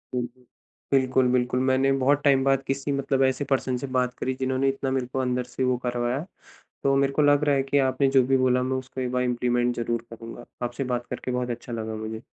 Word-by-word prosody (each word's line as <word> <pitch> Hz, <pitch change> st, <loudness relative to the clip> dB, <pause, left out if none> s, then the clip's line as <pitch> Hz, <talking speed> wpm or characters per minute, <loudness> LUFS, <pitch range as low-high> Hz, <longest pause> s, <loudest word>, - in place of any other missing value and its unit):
बिल्कुल। 125 Hz, +1 st, -5 dB, 0.5 s
बिल्कुल, 130 Hz, -1 st, +3 dB
बिल्कुल। 125 Hz, 0 st, +1 dB
मैंने 135 Hz, +1 st, +3 dB
बहुत 145 Hz, +2 st, +3 dB
टाइम 135 Hz, -2 st, +4 dB
बाद 135 Hz, 0 st, +2 dB
किसी 135 Hz, +1 st, -2 dB
मतलब 140 Hz, -1 st, +1 dB
ऐसे 130 Hz, +2 st, +1 dB
पर्सन 130 Hz, -2 st, 0 dB
से 140 Hz, -, -5 dB
बात 125 Hz, -1 st, +1 dB
करी 130 Hz, -, -1 dB
जिन्होंने 130 Hz, +1 st, +1 dB
इतना 135 Hz, 0 st, -2 dB
मेरे 130 Hz, -1 st, 0 dB
को 130 Hz, +1 st, -3 dB
अंदर 125 Hz, -1 st, 0 dB
से 125 Hz, +1 st, -4 dB
वो 125 Hz, -1 st, +2 dB
करवाया। 125 Hz, +4 st, -1 dB, 0.6 s
तो 135 Hz, 0 st, +3 dB
मेरे 135 Hz, 0 st, +2 dB
को 150 Hz, -, +2 dB
लग 145 Hz, 0 st, +4 dB
रहा 145 Hz, -1 st, +3 dB
है 135 Hz, -, +1 dB
कि 135 Hz, +1 st, 0 dB
आपने 135 Hz, +1 st, +1 dB
जो 130 Hz, -, +7 dB
भी 135 Hz, 0 st, +4 dB
बोला 125 Hz, -1 st, +2 dB
मैं 130 Hz, +1 st, -1 dB
उसको 130 Hz, 0 st, -6 dB
एक 125 Hz, -1 st, -2 dB
बार 125 Hz, 0 st, 0 dB
इंप्लीमेंट 120 Hz, 0 st, 0 dB
ज़रूर 120 Hz, 0 st, -2 dB
करूँगा। 115 Hz, +1 st, -9 dB, 0.2 s
आपसे 120 Hz, +3 st, -3 dB
बात 120 Hz, 0 st, -4 dB
करके 125 Hz, -, -4 dB
बहुत 125 Hz, 0 st, -2 dB
अच्छा 120 Hz, 0 st, -6 dB
लगा 110 Hz, -1 st, -4 dB
मुझे। 110 Hz, 0 st, -5 dB
130 Hz, 230 wpm, -25 LUFS, 125-135 Hz, 0.6 s, जो